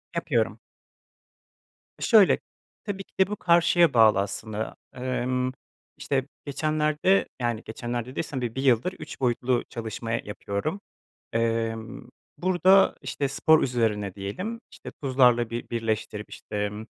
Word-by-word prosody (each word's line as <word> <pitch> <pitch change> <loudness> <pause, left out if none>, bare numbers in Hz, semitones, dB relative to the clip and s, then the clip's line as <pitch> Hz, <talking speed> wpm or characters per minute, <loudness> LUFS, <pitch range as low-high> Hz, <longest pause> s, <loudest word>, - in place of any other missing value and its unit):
Yapıyorum. - - 0 1.4
E, - - -18
şöyle, 215 -5 +6 0.4
tabii 195 -2 -4
ki - - -38
de 190 - +5
bu 210 - -3
karşıya 170 -3 +4
bağlı 110 -4 +6
aslında. 105 +2 -4 0.2
Emm, 125 0 -1 0.5
işte, 135 -1 -1 0.2
geçenlerde, 155 +5 +1
yani, 120 -2 -1
geçenlerde 120 +2 -4
dediysem 135 -2 -4
bi 120 -1 -3
bir 135 - -2
yıldır 130 +8 +3
3 - - -9
boyutlu 125 -1 +1
çalışma 115 0 -5
yapıyorum. 110 - -3 0.5
Emm, 115 0 -2 0.3
burada, 185 +2 +4
işte, 140 - -2
spor 155 +3 +4
üzerine 105 -6 0
diyelim. 185 - -5
İşte, - - -10
tuzlarla 125 -3 +4
bi 120 +1 -5
birleştirip, 110 -2 -3
işte, - - -9
emm, 105 +1 -3
125 Hz, 125 wpm, -26 LUFS, 115-155 Hz, 1.4 s, şöyle